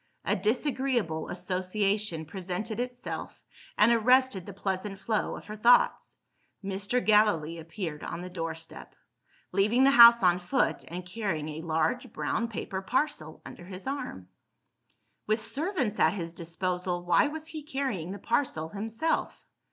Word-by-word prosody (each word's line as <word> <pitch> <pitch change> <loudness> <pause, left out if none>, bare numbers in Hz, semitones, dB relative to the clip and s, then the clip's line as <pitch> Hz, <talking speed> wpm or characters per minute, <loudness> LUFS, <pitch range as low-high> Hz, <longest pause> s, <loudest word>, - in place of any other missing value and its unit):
A - - +2
disagreeable 235 - 0
association 185 0 -1
presented 190 +6 -5
itself, 245 0 -5 0.3
and 210 +3 +6
arrested 240 -4 +3
the - - -6
pleasant 195 +1 -3
flow 215 +1 -1
of - - -10
her 210 - -7
thoughts. 235 +3 +3 0.5
Mr. 200 +5 -1
Gallilee 190 -7 +3
appeared 160 -1 -6
on 170 - -5
the 180 - -6
door 165 -2 -3
step; 165 0 -10 0.6
leaving 210 +7 +3
the 275 - +6
house 235 -3 +9
on 180 0 +4
foot, 240 +9 0
and 175 +1 -6
carrying 180 -5 -3
a 155 +1 -6
large 165 +10 -1
brown 235 - -1
paper 195 -4 -5
parcel 195 - -2
under - - -10
his 185 0 -9
arm. 265 - -5 1.0
With 215 +1 +2
servants 270 - -1
at - - +4
his 170 -4 -5
disposal, 175 +1 -2
why 175 +10 +4
was 310 +1 -6
he 315 -1 -7
carrying 265 - -3
the 200 - -5
parcel 215 - -1
himself? 225 - -2
200 Hz, 145 wpm, -28 LUFS, 175-235 Hz, 1.0 s, house